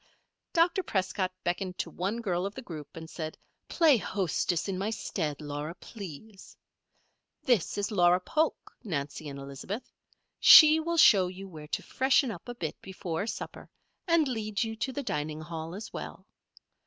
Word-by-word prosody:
Dr. 350 +3 +3
Prescott 190 - -1
beckoned 180 +1 -2
to - - -3
one 200 +6 -2
girl 180 -5 -1
of 200 - -9
the 260 - -6
group, 155 -6 -9
and 160 0 -7
said: 160 -1 -6 0.3
"Play 315 -6 +5
hostess 180 -3 -1
in 190 -2 -2
my 200 +2 -1
stead, 165 -9 -3
Laura, 150 +2 -5
please. 195 0 -11 0.9
This 245 - +1
is 205 +1 -1
Laura 180 -3 +4
Polk, 310 - -1
Nancy 150 - -4
and 140 - -7
Elizabeth. 140 - -7 0.5
She 310 0 +10
will 335 +1 -2
show 195 - +7
you 190 +2 -8
where 155 -4 -10
to - - -3
freshen 265 -1 +2
up 195 +4 -9
a 245 - -5
bit 160 -9 -5
before 190 0 -4
supper, - - -6 0.4
and 335 -3 +4
lead 215 -4 -1
you 225 0 -4
to 265 - -2
the 285 +2 -4
dining 150 - -3
hall, 165 +1 -6
as 215 +3 -8
well. - - -7
190 Hz, 165 wpm, -29 LUFS, 160-230 Hz, 0.9 s, She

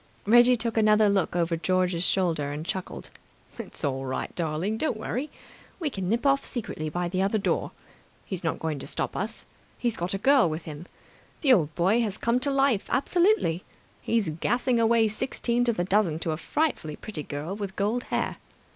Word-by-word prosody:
Reggie 240 +3 +6
took 230 0 -1
another 215 -1 +5
look 195 -3 +1
over 170 -1 +1
George's 180 0 +1
shoulder 165 -7 +1
and 150 +2 -5
chuckled. 185 +1 -5 0.5
"It's - - -6
all 135 -1 -1
right, 130 -1 -4
darling. 170 +6 -2
Don't 310 -8 0
worry. 250 +6 -3 0.5
We 310 -5 -1
can 190 -5 -3
nip 235 +5 0
off 275 0 +3
secretly 155 -10 -4
by 175 +3 -2
the 185 +2 -1
other 200 +3 +1
door. 200 - 0 0.6
He's 185 -3 -5
not 165 - -1
going 155 -3 -3
to - - -7
stop - - -3
us. - - -4 0.3
He's 240 -3 -1
got 175 +3 -2
a - - 0
girl 260 -1 +4
with 155 +1 -4
him! 155 +2 -8 0.5
The 270 -5 +6
old 155 -8 +2
boy 195 +7 +3
has 215 -3 -2
come 235 +2 +1
to 280 - -1
life 275 -6 +2
absolutely! 340 - +2 0.4
He's 225 -7 0
gassing 240 +10 0
away 225 0 +4
sixteen 235 +2 0
to 240 - +4
the 175 - -1
dozen 185 -4 +2
to 165 - -1
a - - -1
frightfully 265 - -1
pretty 190 -4 -6
girl 150 +6 -5
with 200 -2 -5
gold 215 +5 -1
hair. - - -2
200 Hz, 190 wpm, -26 LUFS, 170-235 Hz, 0.6 s, Reggie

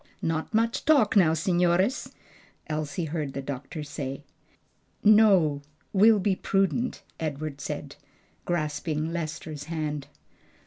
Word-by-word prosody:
"Not 160 -1 -1
much 225 +1 +1
talk 280 -10 +4
now, 170 -6 +5
signores," 180 - +1 0.5
Elsie 155 +2 -3
heard 150 -3 -3
the 140 - -4
doctor 140 +3 -6
say. 140 -1 -5 0.8
"No; 195 -9 +5 0.3
we'll 215 +2 +6
be 200 -1 +1
prudent," 195 +7 0 0.2
Edward 150 -2 -4
said, 145 0 -5 0.5
grasping 155 -1 -2
Lester's 155 -2 -5
hand. 150 -3 -3
160 Hz, 105 wpm, -27 LUFS, 150-190 Hz, 0.8 s, we'll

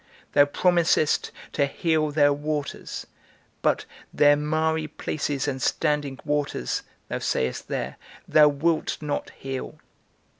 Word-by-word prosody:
Thou 145 - +7
promisest 170 0 +2 0.2
to 140 -2 +1
heal 155 +1 +1
their 145 -1 +4
waters, 145 0 -4 0.6
but - - +1 0.3
their 145 0 +5
miry 155 +1 0
places 145 -2 -2
and 135 -2 -2
standing 145 -3 0
waters, 145 - -1 0.3
thou - - -3
sayest 65 0 -1
there, - - -3 0.3
thou 150 -1 +7
wilt 155 +3 +1
not 150 -2 -3
heal. 135 -1 -5
150 Hz, 115 wpm, -25 LUFS, 145-155 Hz, 0.6 s, Thou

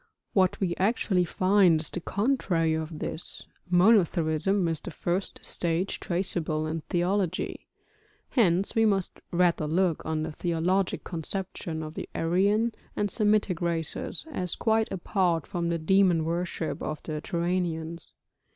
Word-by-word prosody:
What 185 -2 +3
we 175 -3 0
actually 190 -3 +2
find 185 -1 +4
is 155 - +1
the - - -1
contrary 195 -7 +1
of 160 0 -3
this, 160 - -5 0.2
monotheism 180 -1 +3
is 165 -2 -1
the - - -6
first 175 +3 -3
stage 170 +2 -1
traceable 170 -3 -1
in 160 +1 -3
theology. 180 +1 -1 0.6
Hence 190 -6 +3
we 225 - +3
must 195 -4 0
rather 170 -3 +2
look 170 +1 +1
on 155 -1 -2
the 160 - -4
theologic 175 +4 0
conception 170 -1 -4
of 155 0 -7
the - - -6
Aryan 200 +7 +2 0.2
and 205 -1 -1
Semitic 210 -5 +1
races 170 - -2
as 180 - -1
quite 220 -1 +1
apart 175 -3 0
from 170 -3 -2
the 170 - 0
demon 175 -1 +3
worship 170 -1 -2
of 155 -1 -4
the 155 -2 -4
Turanians. 170 -2 -2
175 Hz, 135 wpm, -27 LUFS, 165-195 Hz, 0.6 s, find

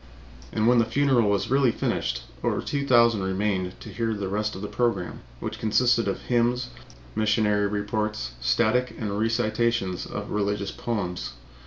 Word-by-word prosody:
And 110 - 0
when 120 +1 +5
the 115 - +4
funeral 125 -2 +3
was 100 +4 0
really 135 -1 +4
finished, - - -2 0.2
over - - +1
two 140 -1 -2
thousand 115 -4 +5
remained 95 -1 -1
to - - -9
hear 115 +2 -1
the 100 -2 -3
rest 105 +2 -1
of 95 - -7
the - - -2
program, 120 +2 -1 0.2
which - - -5
consisted 115 +1 +3
of 100 - -2
hymns, 125 +1 +1 0.4
missionary 105 -1 +2
reports, 105 - -2
static 125 - +2
and 105 -2 -3
recitations 115 -3 0
of 100 0 -6
religious 100 -1 -1
poems. 90 - -3
110 Hz, 155 wpm, -26 LUFS, 100-120 Hz, 0.4 s, when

